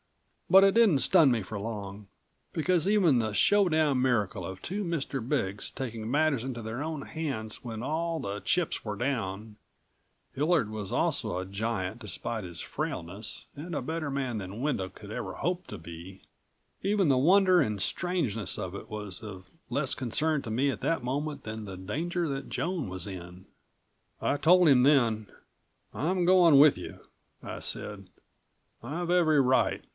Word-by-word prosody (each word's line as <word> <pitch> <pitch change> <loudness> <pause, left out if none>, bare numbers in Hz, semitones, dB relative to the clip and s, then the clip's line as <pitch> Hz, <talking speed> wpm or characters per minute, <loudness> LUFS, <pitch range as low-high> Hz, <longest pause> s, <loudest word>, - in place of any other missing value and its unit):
But 190 +1 +8
it 195 - +4
didn't 220 -11 +5
stun 160 -2 +5
me 115 -4 0
for 105 +3 -6
long, 100 -1 -6 0.4
because 170 0 +1
even 190 - +4
the 110 -2 -1
showdown 155 - +3
miracle 110 -8 0
of 95 +1 -7
two 205 +3 -3
Mr. 140 - -3
Big's 100 -8 -1
taking 115 -4 -5
matters 145 -2 +2
into 125 -3 -5
their 110 +5 -4
own 155 -3 -4
hands 135 -10 -5
when 115 -2 -5
all 165 +5 -1
of - - -6
the 100 +1 -3
chips 180 -2 0
were 105 -2 -4
down 110 -5 -3 0.8
Hillard 150 -5 +2
was 105 -2 -5
also 125 - 0
a 90 - -3
giant 100 +1 -3
despite 110 0 -4
his 85 -2 -8
frailness 95 +6 -4
and 165 +4 -7
a - - -1
better 160 +2 -3
man 130 -5 -2
than 95 +3 -7
Wendel 125 -9 -1
could - - -12
ever - - -4
hope 180 +1 -2
to - - -7
be 85 +3 -11 0.6
even 200 -2 +2
the 135 -2 +4
wonder 185 +5 +5
and 105 -7 -1
strangeness 130 - -1
of 90 -1 -4
it - - -9
was 105 -3 -4
of 95 -4 -9 0.2
less 140 0 0
concern 145 +4 0
to 115 - -6
me 130 +6 +2
at - - -7
that 165 -6 0
moment 145 +4 -3
than 110 0 -6
the 95 -3 -7
danger 165 - -2
that 135 -1 -4
Joan 165 - -2
was 90 -1 -3
in. 90 -1 -9 0.7
I - - +1
told 175 +4 +5
him 135 -4 +6
then. 120 -7 +3 0.7
"I'm 175 +4 0
going 175 -5 +6
with 145 0 +7
you," - - -8 0.4
I - - -6
said. 100 -3 -3 0.7
"I've 170 +8 -3
every 160 -4 +4
right. 130 -1 +2
130 Hz, 170 wpm, -29 LUFS, 105-160 Hz, 0.8 s, But